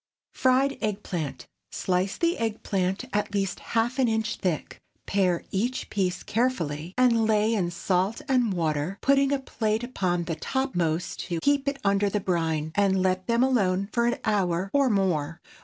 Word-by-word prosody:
FRIED 265 +2 +2
EGG 210 -2 -2
PLANT. 140 -8 -4 0.3
✠ - - -6
Slice 185 +1 0
the 340 0 +1
egg 225 -2 -2
plant 190 -1 -1
at 205 0 -1
least 195 -1 -1
half 235 +3 -1
an 255 - +4
inch 220 -1 -1
thick; 175 -5 -3 0.2
pare 185 -3 +1
each 240 +7 -2
piece 185 -3 -1
carefully, 180 - -1
and 235 -3 +4
lay 215 +1 +3
in 185 -6 0
salt 185 +4 0
and 250 -5 +2
water, 160 +1 -1
putting 275 0 +3
a 280 - +3
plate 225 -4 -2
upon 185 -8 -1
the 170 - -3
topmost 175 - -1
to 170 -2 -2
keep 285 - +1
it 280 0 0
under 200 0 +2
the 210 - 0
brine, 160 -4 -1
and 195 -1 +2
let 185 0 0
them 235 +1 +3
alone 200 -7 +1
for 235 0 +2
an 240 - 0
hour 195 -3 0
or 280 -2 +4
more. 170 -6 0
200 Hz, 175 wpm, -26 LUFS, 180-235 Hz, 0.3 s, an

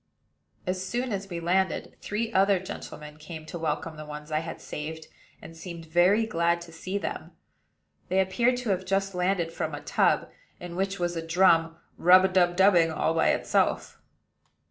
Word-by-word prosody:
As 185 0 -2
soon 240 +6 -2
as 195 -1 -4
we 170 -2 -4
landed, 185 +3 0
three 225 +2 -3
other 195 +1 +4
gentlemen 150 -4 -8
came 155 0 -9
to 170 +2 -7
welcome 160 0 -3
the 155 - -7
ones 150 +1 -8
I 155 - +1
had 160 0 -7
saved, 160 +1 -6 0.4
and 165 - -11
seemed 170 0 -8
very 180 +7 +3
glad 170 -5 +1
to 170 -1 -11
see 185 +4 -4
them. - - -5 0.8
They 190 +2 +2
appeared 235 +7 +2
to 250 -3 -4
have 185 -1 0
just 195 +1 -1
landed 180 -2 0
from - - -3
a - - -8
tub - - +1 0.3
in 175 -1 -8
which 195 +1 -1
was 175 -1 -1
a 165 - -2
drum, 165 -1 +3 0.2
rub 185 +2 +6
a - - +2
dub 175 -2 +3
dubbing 180 -4 +5
all 160 +1 0
by 165 - +3
itself. - - 0
175 Hz, 180 wpm, -27 LUFS, 165-190 Hz, 0.8 s, rub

